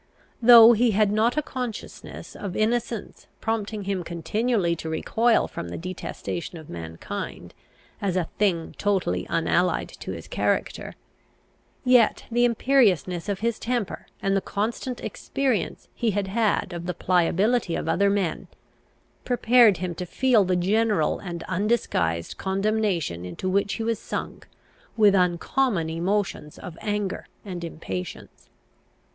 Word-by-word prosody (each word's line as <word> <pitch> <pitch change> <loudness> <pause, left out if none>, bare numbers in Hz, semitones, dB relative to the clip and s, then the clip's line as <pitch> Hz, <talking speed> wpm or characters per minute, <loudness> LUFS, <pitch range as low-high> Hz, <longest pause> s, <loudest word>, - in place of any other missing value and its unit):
Though 235 0 +10
he 235 +2 +3
had 210 -2 +4
not 225 +5 +2
a 305 - +2
consciousness 250 -6 -7
of 195 -3 -5
innocence 230 0 -2
prompting 215 -1 -2
him 195 -2 -2
continually 175 +2 0
to 160 - -5
recoil 225 +8 +2
from 85 - -6
the 85 - -5
detestation 175 -1 -5
of 160 -2 -11
mankind 80 -1 -6 0.5
as 195 -3 0
a 185 - +2 0.2
thing 180 -6 +1
totally 180 - 0
unallied 175 +2 +1
to - - -6
his - - -7
character, - - -1 0.9
yet 250 -3 +4
the 240 +1 +3
imperiousness 210 - +2
of 200 -1 -2
his 230 0 0
temper 240 -4 -3 0.2
and 195 0 +2
the 195 - +2
constant 230 +6 -3
experience 265 -5 -2
he 235 - 0
had 200 -1 -1
had 210 -3 +1
of 170 0 -6
the 180 - -2
pliability 185 +4 +2
of - - -3
other 200 +1 +3
men, 200 -5 -1 0.8
prepared 240 -4 +5
him 180 0 -3
to 180 +2 -6
feel 250 0 +3
the 185 -1 +1
general 200 -2 +1
and 170 -3 -6
undisguised 175 - -1
condemnation 195 - 0
into 90 - -5
which 200 +1 +1
he 225 - -3
was 230 0 -1
sunk - - -6 0.5
with 210 -3 +6
uncommon 180 +1 +1
emotions 175 -2 -2
of 175 - -9
anger 205 -2 -2 0.2
and 180 -3 -6
impatience. 95 - -7
200 Hz, 135 wpm, -25 LUFS, 175-225 Hz, 0.9 s, Though